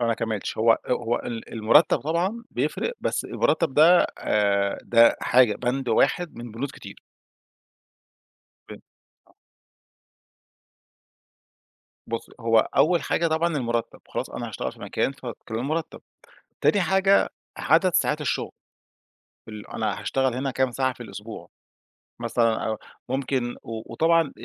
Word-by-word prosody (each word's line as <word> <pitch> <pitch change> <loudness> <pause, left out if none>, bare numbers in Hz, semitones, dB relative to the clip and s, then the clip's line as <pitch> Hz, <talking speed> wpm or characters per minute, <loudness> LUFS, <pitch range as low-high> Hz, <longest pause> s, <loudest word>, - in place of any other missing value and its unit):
أنا 120 - +1
ما 115 - +2
كمّلتش. 110 -3 -4
هو، 115 +1 +5
آآ، 120 - -2
هو 120 -1 0
ال 115 -2 -7
المرتَّب 115 +8 +4
طبعًا 180 +9 -1
بيفرِق، 475 - -2
بس - - -1
المُرتّب 165 -6 0
ده، 170 +4 +6
آآ، 100 -1 +1
ده 115 0 +5
حاجة، 120 -4 +4
بند 125 +1 -2
واحد 170 +9 +1
من 120 0 -8
بنود 135 +5 -4
كتير. - - -12 1.7
فين؟ - - -11 0.5
آه. - - -27 2.7
بُصّي، - - -5
هو - - +3 0.2
أول 175 -2 +4
حاجة 170 - 0
طبعًا 160 0 0
المرتّب، 120 -3 -2
خلاص - - -4
أنا - - -5
هاشتغل - - -4
في - - -17
مكان 135 - -1
ف 135 -2 -13 0.2
كام 110 0 -4
المرتّب، 155 +6 -3 0.6
تاني 205 - +3
حاجة 195 +1 +3 0.3
عدد 165 +4 +3
ساعات 150 0 +1
الشُغل 145 - -2 1.0
ال 105 -1 -9
أنا 110 -3 -3
هاشتغل 130 -2 0
هنا 135 +1 -2
كام 130 -1 0
ساعة 130 0 0
في 120 - -10
الأسبوع؟ 105 +1 -9 0.7
مثلًا 115 -1 +1
أو 110 - -2 0.3
ممكن 130 -2 -2
و 115 0 -7
وطبعًا 165 +6 +4
آآ 145 - -7
130 Hz, 135 wpm, -25 LUFS, 115-160 Hz, 2.7 s, ده